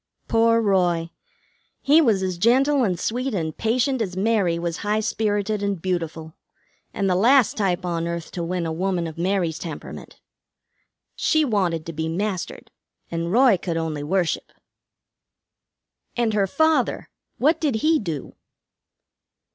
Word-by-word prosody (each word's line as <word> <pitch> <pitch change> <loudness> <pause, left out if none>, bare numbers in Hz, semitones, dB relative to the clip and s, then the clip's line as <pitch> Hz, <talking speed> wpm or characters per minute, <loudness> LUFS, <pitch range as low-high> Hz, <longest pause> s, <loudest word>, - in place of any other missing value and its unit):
Poor 230 0 +3
Roy! 175 -5 +1 0.7
He 300 +4 +5
was 215 -9 +2
as 185 -2 -3
gentle 265 +6 +3
and 185 -6 0
sweet 250 +1 -2
and 160 -4 -2
patient 250 +3 0
as 185 -4 -3
Mary 195 -4 +1
was 170 0 -3
high 210 +1 0
spirited 210 -1 -1
and 200 -2 -1
beautiful, 165 -3 -3 0.6
and 195 - -1
the 185 - +2
last 235 +5 +4
type 185 -3 -1
on 170 -1 -2
earth 170 -1 -5
to 175 - -4
win 175 0 -2
a 165 - -2
woman 180 0 -1
of 160 0 -7
Mary's 175 -3 0
temperament. 160 -4 -8 1.0
She 315 -1 +2
wanted 180 - 0
to 165 - -6
be 160 +1 -3
mastered, 185 +2 -4 0.4
and 170 0 -2
Roy 240 -2 +5
could 170 -1 -3
only 160 -2 -3
worship." 175 +2 -1 1.7
"And 235 -2 +1
her 200 -2 +2
father 305 +1 +1 0.3
what 305 +6 +2
did 290 -7 +1
he 320 0 +4
do?" 165 - -5
190 Hz, 145 wpm, -23 LUFS, 170-230 Hz, 1.7 s, He